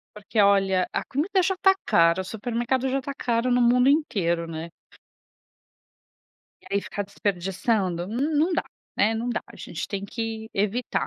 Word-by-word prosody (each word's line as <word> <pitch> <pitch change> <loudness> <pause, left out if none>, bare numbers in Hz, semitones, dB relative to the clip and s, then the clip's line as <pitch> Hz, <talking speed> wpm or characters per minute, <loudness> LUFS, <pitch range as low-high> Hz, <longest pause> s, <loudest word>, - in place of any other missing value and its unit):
Porque, 210 +1 -1
olha, 195 -2 +4
a - - -1
comida 340 +8 0
já 380 +1 +1
está 385 +1 +4
cara. 170 +2 +4
O - - -11
supermercado 240 +5 -1
já 270 - 0
está 275 +1 -5
caro 240 -1 0
no 245 0 +3
mundo 250 +2 +4
inteiro, 185 - +1
né? 165 +1 -6 2.0
E - - -2
aí 200 - +3
ficar 205 +1 -4
desperdiçando. 190 -1 -1
N 270 +9 -1
não 335 +4 +2
dá, - - 0 0.3
né. 220 +2 +3
Não 230 +2 -2
dá. - - -2
A - - -14
gente - - -6
tem 200 -1 -4
que 220 +1 -5
evitar. 210 +4 -1
225 Hz, 170 wpm, -25 LUFS, 195-255 Hz, 2.0 s, olha